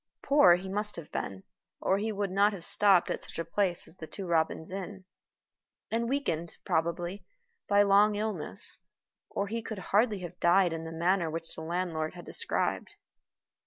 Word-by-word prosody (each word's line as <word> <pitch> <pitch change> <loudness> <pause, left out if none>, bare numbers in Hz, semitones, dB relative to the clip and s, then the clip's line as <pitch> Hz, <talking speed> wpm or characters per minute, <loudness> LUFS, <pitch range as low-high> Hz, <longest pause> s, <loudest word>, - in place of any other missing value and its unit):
Poor 275 -12 +6
he 185 +2 -6
must 210 +2 -1
have 165 -3 -9
been, 95 0 -4 0.4
or 195 - +1
he 220 +2 -1
would 200 -2 -2
not 200 +2 +3
have 185 -4 -7
stopped 195 -4 +4
at - - -3
such - - -9
a 165 - -2
place 180 +1 0
as 175 - -10
the 160 - -8
Two 195 - -7
Robins 160 0 0
Inn; 190 0 -6 0.9
and 230 +1 0
weakened, 170 - -2
probably, 175 +2 -1 0.4
by 205 0 +5
long 205 +1 +5
illness, 205 - -1 0.5
or 200 - -1
he 230 +3 -3
could 220 -1 -6 0.2
hardly 210 -2 +3
have 180 0 -8
died 175 0 +4
in 165 0 -5
the 165 - -6
manner 170 +1 +1
which 165 +1 -4
the - - -8
landlord 165 -1 -2
had 175 - -10
described. - - -2
185 Hz, 175 wpm, -30 LUFS, 165-205 Hz, 0.9 s, Poor